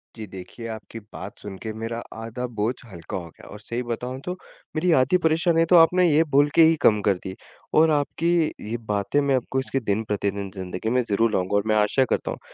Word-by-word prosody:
जी 110 -2 -7
देखिए, 95 +5 -9
आपकी 110 0 -8
बात 95 +5 -8
सुन 100 -2 -8
के 110 - -3
मेरा 115 +1 -4 0.2
आधा 115 +3 -5
बोझ 110 +4 +1 0.2
हल्का 85 +1 -6
हो 85 -2 -7
गया - - -16
और 105 - -10
सही 120 +3 -4
बताऊँ 125 +2 -4
तो 180 - -2 0.4
मेरी 175 +3 +2
आधी 180 +8 +3
परेशानियाँ 165 +1 +3
तो 180 - +6
आपने 180 +2 +5
ये 155 +3 +5
बोल 145 +1 +5
के 165 - +7
ही 165 +1 +5
कम 105 -1 +4
कर 100 0 +3
दी। 95 0 -6 0.4
और 160 +1 +5
आपकी 150 +3 0 0.4
ये 120 - -2
बातें 100 +7 +1
मैं 140 -1 +2
आपको 130 +1 -1
इसके 135 +1 -2
दिन-प्रतिदिन 100 -3 -2
ज़िन्दगी 95 +3 -4
में 125 +2 +2
ज़रूर 110 +2 +2
लाऊँगा 95 +2 0
और 100 - +2
मैं 110 - +2
आशा 105 +5 +3
करता - - -1
हूँ - - -6
115 Hz, 215 wpm, -24 LUFS, 100-145 Hz, 0.4 s, के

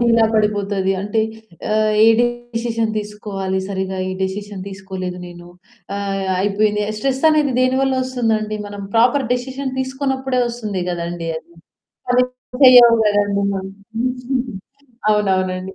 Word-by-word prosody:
డీలా 230 -1 +4
పడిపోతది. 205 -2 +1
అంటే 210 +2 0 0.8
ఏ - - +6
డిసిషన్ 235 -2 -1
తీసుకోవాలి 205 -2 -4
సరిగ్గా, 190 -1 -3
ఈ - - -3
డిసిషన్ 200 0 -5
తీసుకోలేదు 190 -2 -6
నేను, 175 0 -12 0.5
ఆహ్, 195 -1 -2
అయిపోయింది. 210 +1 +1 0.2
స్ట్రెస్ 265 +4 -1
అనేది 300 -3 +2
దేనివల్ల 265 +1 +2
వస్తుందండి? 220 -4 -1
మనం 205 0 -7
ప్రాపర్ 245 +3 +4
డిసిషన్ 265 +2 -4
తీసుకోనప్పుడే 265 -1 -1
వస్తుంది 215 -6 -3
కదండీ 170 -1 -4
అది. 170 - -21 0.6
పని 250 0 +4 0.4
చేయవు 245 -2 +9
కదండీ! 205 -1 +2 1.7
అవునవునండి. 190 -2 0
210 Hz, 105 wpm, -19 LUFS, 195-245 Hz, 1.7 s, చేయవు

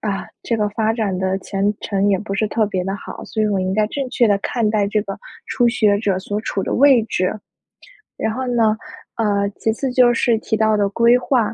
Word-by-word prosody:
啊， 200 -3 -3 0.2
这 230 - -1
个 210 -1 0
发 220 +1 0
展 210 -5 -1
的 190 +1 -1
前 200 +1 -1
程， 200 0 0
也 195 -2 +2
不 195 -1 -5
是 215 +1 0
特 215 -1 +1
别 185 -3 -2
地 195 - -2
好。 - - -9
所 220 - -4
以 - - +2
我 200 -2 0
应 185 0 -1
该 215 0 +2
正 270 +3 -4
确 240 - +3
地 205 -1 +3
看 220 +2 -1
待 210 -2 +1
这 210 +1 +1
个 195 -2 -6 0.3
初 240 -1 +2
学 210 -3 +2
者 195 -4 0
所 205 +2 -4
处 200 -3 -3
的 - - -2
位 270 -4 +5
置。 185 -4 -1 0.9
然 220 - -1
后 260 +1 -3
呢， 225 -3 +2 0.4
呃， 200 -2 +1
其 220 - 0
次 260 +2 -3
就 250 -1 +4
是 235 -1 +2
提 220 - -2
到 220 -1 +2
的 200 -1 +2
规 235 +4 +4
划， 235 -4 0
215 Hz, 250 characters per minute, -19 LUFS, 200-230 Hz, 0.9 s, 位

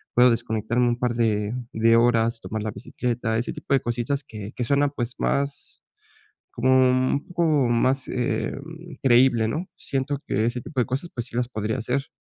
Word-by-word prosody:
Puedo 125 +1 +7
desconectarme 115 +2 0
un 120 +1 -1
par 125 -1 0
de 110 -2 +1 0.2
de 115 +1 +4
horas, 115 -1 +3
tomar 110 -1 -4
la 110 - -2
bicicleta, 115 0 -2
ese 120 - -2
tipo - - -3
de 135 - +4
cositas 120 +4 -2
que 105 -4 -8
que 125 - -2
suenan, 140 +3 +2
pues, 120 0 -3
más 140 0 -2 0.7
como 130 +2 +1 0.2
u - - +4
un 130 +2 0
poco 175 -1 0 0.2
más, 130 +3 +1
eh, 120 -3 -1
mm, 165 +1 -10
creíble, 120 -3 +5
¿no?, 160 +10 -3
siento 135 +1 -2
que 110 - +1
ese 120 +1 -1
tipo 140 - -5
de - - +1
cosas 135 +7 -3
pues 120 0 -3
sí 120 - -11
las 125 - +1
podría 110 0 -2
hacer. 125 +5 -2
120 Hz, 190 wpm, -24 LUFS, 115-135 Hz, 0.7 s, Puedo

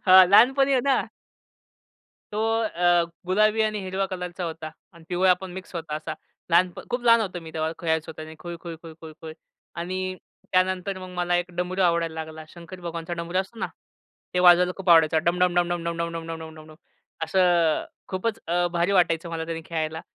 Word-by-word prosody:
हां, 185 0 +9
लहानपणी 270 +6 +6
आहे 260 - +4
ना. 275 -1 +3 1.3
तो 210 - -3 0.2
अ, 175 -5 +2 0.2
गुलाबी 215 +4 +3
आणि 215 -1 0
हिरवा 190 +1 -2
कलरचा 180 -1 -5
होता. 160 -1 -5 0.2
आणि 170 -1 -17
पिवळा 180 0 +4
पण 190 -1 -7
मिक्स 185 0 -9
होता 165 -3 -4
असा. 155 0 -5 0.4
लहानप 175 +1 +3
खूप 245 0 -1
लहान 230 -1 +6
होतो 185 -5 -3
मी 165 -1 -10
तेव्हा, 160 0 -1
खेळायचो 160 -1 -1
त्यानी 155 0 -8
खुळखुळ, 170 -1 -7
खुळखुळ, 160 -1 -11
खुळ. 160 -1 -8 0.4
आणि 185 +2 -3 0.4
त्यानंतर 185 +1 +1
मग 185 0 -8
मला 175 0 +1
एक 175 0 -2
डमरू 180 +2 -2
आवडायला 170 -2 +1
लागला. 160 0 -7
शंकर 170 +2 -11
भगवानचा 170 0 -5
डमरू 170 +1 -2
असतो 195 +4 -4
ना, - - -1 0.7
ते - - +2
वाजवायला 180 0 +6
खूप 195 -2 -1
आवडायचं 160 -1 +5
डम-डम, 180 +1 +2
डम-डम, 175 -1 0
डम-डम, 170 0 -2
डम-डम, 165 0 -5
डम-डम, 160 -1 -10
डम. 155 - -13 0.5
असं 170 -2 +2 0.2
खूपच 210 +4 -2
अ, 175 +1 +1
भारी 175 +3 +1
वाटायचं 170 -3 +2
मला 165 -1 -3
त्यानी 165 0 -5
खेळायला. 160 -1 -3
175 Hz, 175 wpm, -25 LUFS, 165-185 Hz, 1.3 s, हां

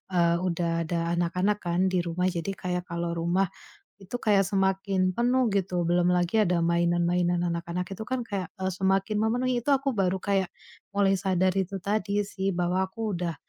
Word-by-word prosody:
eee, 170 -1 +3
udah 170 -2 -1
ada 170 0 -1
anak-anak 180 +4 0
kan 175 +2 +1
di 185 - +2
rumah 175 +2 -1
jadi, 175 +2 -3
kayak 180 +2 -3
kalau 170 0 -2
rumah 175 +3 +1 0.5
itu 195 +5 -7
kayak 200 -2 +3
semakin 190 -1 +1
penuh, 245 +1 +2
gitu. 180 -3 0
Belum 175 +1 +3
lagi 180 +4 +2
ada 175 -2 +1
mainan-mainan 175 +1 +2
anak-anak 170 +1 -3
itu 220 - -6
kan 255 -2 -2
kayak, 195 -4 -3
eee, 190 - -1
semakin 195 +2 +1
memenuhi. 245 +2 0
Itu 285 - +1
aku 270 -2 -1
baru 190 -1 +1
kayak 195 -2 +1 0.5
mulai 195 -1 +3
sadar 185 -1 +1
itu 195 +1 -1
tadi 205 0 0
sih 195 -1 -2
bahwa 180 +2 +1
aku 215 0 -3
udah 170 -2 -2
185 Hz, 175 wpm, -27 LUFS, 175-200 Hz, 0.5 s, eee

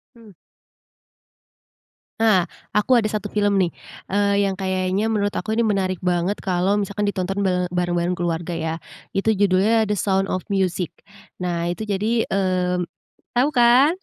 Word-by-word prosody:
Mmm. 220 -4 -16 1.9
Ah, 190 -6 +4 0.3
aku 230 +5 +3
ada 220 -3 +3
1 210 -1 -3
film 205 -1 +2
nih, 180 -3 +1 0.3
eee, 200 0 +2
yang 195 - 0
kayaknya 190 +2 -1
menurut 205 -2 0
aku 215 - -4
ini 235 - +3
menarik 190 -3 0
banget 180 +3 0
kalau 185 +2 +1
misalkan 205 0 -1
ditonton 195 +1 -2
ba 180 -2 +1
bareng-bareng 175 0 0
keluarga 170 0 -2
ya, 160 0 -2 0.4
itu 220 +3 +2
judulnya 205 +3 +3
The 210 - 0
Sound 195 0 +1
of 185 - -2
Music, 185 -3 -1 0.5
nah 170 -1 -1
itu 205 +5 -4
jadi, 215 +4 +1
mmm, 180 -2 0 0.5
tahu 270 +4 +4
kan? 250 +6 +5
195 Hz, 145 wpm, -22 LUFS, 180-210 Hz, 1.9 s, kan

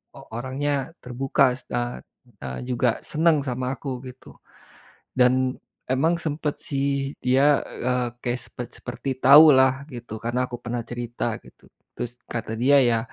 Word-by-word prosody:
o - - -11
orangnya 135 +5 -2
terbuka 130 +1 +2
se - - -19
a 120 0 -2 0.4
eee, 65 -1 -5
juga 125 0 +1
senang 155 -2 +2
sama 130 -1 -3
aku, 130 -4 -5
gitu. 130 0 -13 0.8
Dan, 130 +1 +3 0.3
emang 150 +6 +2
sempat, 150 -1 -2
sih, 140 0 -2
dia, 135 +3 +3
eee, 125 0 -1
kayak 120 0 -1
sepet 125 - -7
seperti 125 +2 -7
tahulah, 135 -2 +7
gitu. 120 -4 -8
Karena, 120 +2 0
aku 120 -1 -8
pernah 120 -1 -4
cerita, 120 -1 -3
gitu. - - -19 0.3
Terus, 120 0 -4 0.2
kata 115 -1 -4
dia, 130 +5 +4
"Ya, 120 -4 +4
130 Hz, 140 wpm, -24 LUFS, 120-140 Hz, 0.8 s, tahulah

